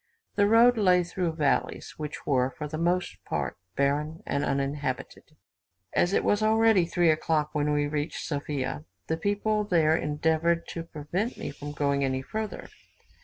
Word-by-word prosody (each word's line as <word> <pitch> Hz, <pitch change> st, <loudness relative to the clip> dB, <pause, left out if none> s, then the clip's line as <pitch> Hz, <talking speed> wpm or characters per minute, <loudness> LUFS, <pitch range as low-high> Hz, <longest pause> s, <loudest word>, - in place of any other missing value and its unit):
The 205 Hz, 0 st, +3 dB
road 230 Hz, +2 st, +6 dB
lay 180 Hz, -3 st, +4 dB
through 175 Hz, -1 st, -2 dB
valleys, 150 Hz, -3 st, 0 dB
which 150 Hz, -1 st, -6 dB
were, 130 Hz, -2 st, +2 dB
for 150 Hz, +3 st, -6 dB
the 155 Hz, +1 st, -5 dB
most 175 Hz, +2 st, -1 dB
part, -, -, -3 dB, 0.2 s
barren 150 Hz, +3 st, 0 dB
and 140 Hz, 0 st, -1 dB
uninhabited. 140 Hz, -2 st, -3 dB, 0.6 s
As 175 Hz, -, +2 dB
it -, -, +2 dB
was 205 Hz, -, +2 dB
already 220 Hz, -4 st, +4 dB
3 170 Hz, -1 st, +3 dB
o'clock 155 Hz, -1 st, 0 dB
when 150 Hz, -1 st, +1 dB
we 145 Hz, 0 st, +2 dB
reached 145 Hz, +1 st, -3 dB
Sophia, 140 Hz, -, -3 dB, 0.2 s
the 160 Hz, -, -1 dB
people 205 Hz, +4 st, 0 dB
there 165 Hz, -6 st, +3 dB
endeavoured 160 Hz, +2 st, +1 dB
to 165 Hz, -, -4 dB
prevent 165 Hz, -, -4 dB
me -, -, -5 dB
from 145 Hz, +1 st, -8 dB
going 140 Hz, -1 st, +1 dB
any 130 Hz, 0 st, -1 dB
further. 215 Hz, +7 st, -5 dB
155 Hz, 160 wpm, -27 LUFS, 145-180 Hz, 0.6 s, road